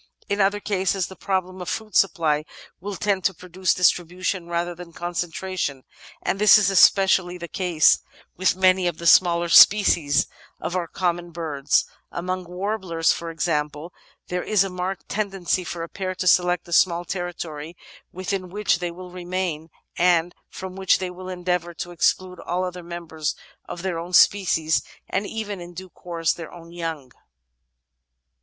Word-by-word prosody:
In 200 0 0
other 200 +1 +2
cases 195 -2 0
the 190 - -10
problem 185 -1 -2
of 180 - -5
food 220 -1 -5
supply 160 -6 +2 0.4
will 200 +3 -5
tend 195 -1 0
to 190 - +2
produce 180 +1 -1
distribution 180 0 +1
rather 170 +1 -2
than 175 -1 -11
con 175 +1 -5
centration, 175 -5 -3 0.4
and 195 - -1
this 210 0 +8
is 200 -2 +2
especially 190 -2 +4
the 170 -1 -7
case 175 -3 +3 0.4
i^th 185 0 +2
many 185 -1 +3
of 170 -2 -2
the 170 - -8
smaller 170 0 +5
species 170 -6 +6 0.3
of 175 - -4
our 175 -2 -1
common 175 -1 -2
birds: 150 -5 0 0.3
among 185 +1 -3
warblers, 180 -2 0
for 170 - -6
example, 155 0 -2 0.3
there 180 0 -2
is 205 0 +2
a 195 - -4
marked 180 +1 -4
tendency 195 -3 -1
for 170 0 -5
a - - -5
pair 185 +1 -4
to 185 - -4
select 180 -1 +3
a 170 - -6
small 175 0 +3
territory 170 -3 -5 0.3
within 185 0 -4
which 200 -1 0
they 175 -1 -2
will 180 +1 -10
remain 175 -3 -3 0.3
and 175 -1 +3 0.2
from 185 -1 -8
which 190 -2 +3
they 185 -1 -4
will 185 +1 -9
endeavour 180 -1 -2
to 175 - -6
exclude 180 +1 0
all 180 +2 -2
other 180 -1 -5
members 170 -3 -4 0.3
of 175 - -7
their 180 -3 -2
own 175 +2 -7
species 165 -6 +4 0.3
and 200 +2 -2
even, 210 -4 -5
in 175 0 -10
due 185 +1 -8
course, 165 -2 -2
their 165 -2 -9
own 170 -1 -12
young. 165 -6 -5
180 Hz, 165 wpm, -23 LUFS, 170-185 Hz, 0.4 s, this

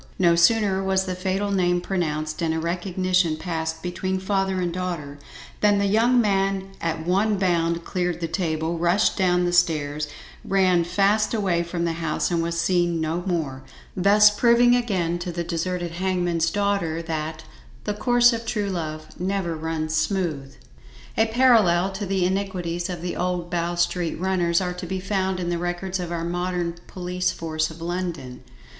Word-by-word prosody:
No 170 -2 +4
sooner 195 +2 +3
was 190 0 +1
the 185 - -2
fatal 190 +2 -1
name 180 -2 +2
pronounced 155 -4 -2
and 160 -1 0
a - - -1
recognition 180 0 0
passed 160 -1 -4
between 185 +1 -2
father 190 -1 0
and 175 -2 -1
daughter, 170 -6 -4 0.4
than 205 -1 +4
the 200 - +1
young 230 +5 +3
man 195 -2 +1
at 160 -1 -2
one 200 +4 +2
bound 170 -3 0
cleared 180 -2 -2
the 165 - -2
table, 165 -2 -2
rushed 175 +5 +2
down 180 -2 +2
the 175 - 0
stairs, 150 -4 +1 0.4
ran 185 -3 +3
fast 200 +5 +2
away 190 -5 +1
from 170 0 -3
the 165 - 0
house 160 +2 -1
and 170 -1 +1
was 170 0 -2
seen 175 -1 +1
no 160 +2 -1
more; 150 -7 -2 0.3
thus 205 +3 +6
proving 240 +3 +4
again 185 -8 0
to 175 0 -4
the 170 0 -3
deserted 175 +1 -2
hangman's 175 -2 0
daughter, 195 -4 -1
that 160 -1 -4 0.4
"the 210 - -2
course 240 +3 +4
of 230 0 -3
true 210 -3 -2
love 155 -3 -4
never 185 -2 -1
runs 160 0 -3
smooth." 160 -6 -1 0.6
A 220 - +3
parallel 220 -7 +4
to 195 +1 -5
the 190 -1 +1
iniquities 180 -3 -2
of 175 -2 -5
the 180 - -3
old 180 -1 -2
Bow 175 0 -1
Street 175 -1 0
runners 175 -2 +1
are 180 -1 -2
to 180 - -7
be 190 0 -3
found 190 -1 -1
in 175 -1 -2
the 170 -1 -1
records 175 +2 -3
of 175 -1 -4
our 170 -1 -2
modern 175 0 -2
police 180 0 -2
force 160 -1 -2
of 165 0 -10
London. 170 -7 -4
180 Hz, 170 wpm, -24 LUFS, 170-190 Hz, 0.6 s, thus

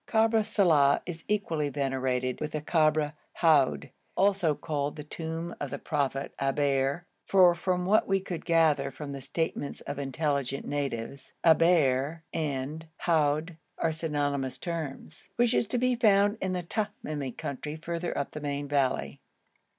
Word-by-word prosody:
Kabr 225 -1 +3
Saleh 155 -10 +4
is 165 -2 -7
equally 165 -8 0
venerated 130 -2 -1
with 155 0 -3
the 155 - -2
Kabr 155 -1 +2 0.2
Houd, 140 - +3 0.3
also 190 -5 +3
called 145 -2 -2
the 150 - -7
tomb 165 +2 -5
of - - -3
the - - -4
prophet 140 -2 -2
Eber 140 +3 +1 0.2
(for, 185 -3 +6
from 180 +1 -1
what 210 +4 +3
we 195 0 +2
could 180 -3 -6
gather 160 -4 +3
from 140 +2 -7
the 140 -1 -6
statements 145 +1 -3
of 145 - -5
intelligent 140 -1 -1
natives, 140 -2 -4
Eber 160 -2 +3
and 155 0 -3
Houd 155 0 +1 0.2
are 165 - +1
synonymous 145 -4 -2
terms) 160 -3 -6
which 240 0 +3
is 235 - +2
to 245 - -1
be 250 +1 +2
found 205 -2 +4
in 185 -1 -1
the 180 -1 -2
Tamimi 160 - -4
country 150 +2 -5
further 170 +2 -4
up 140 - -2
the 150 - -7
main 145 0 -3
valley. 140 -2 0
155 Hz, 150 wpm, -28 LUFS, 140-175 Hz, 0.3 s, for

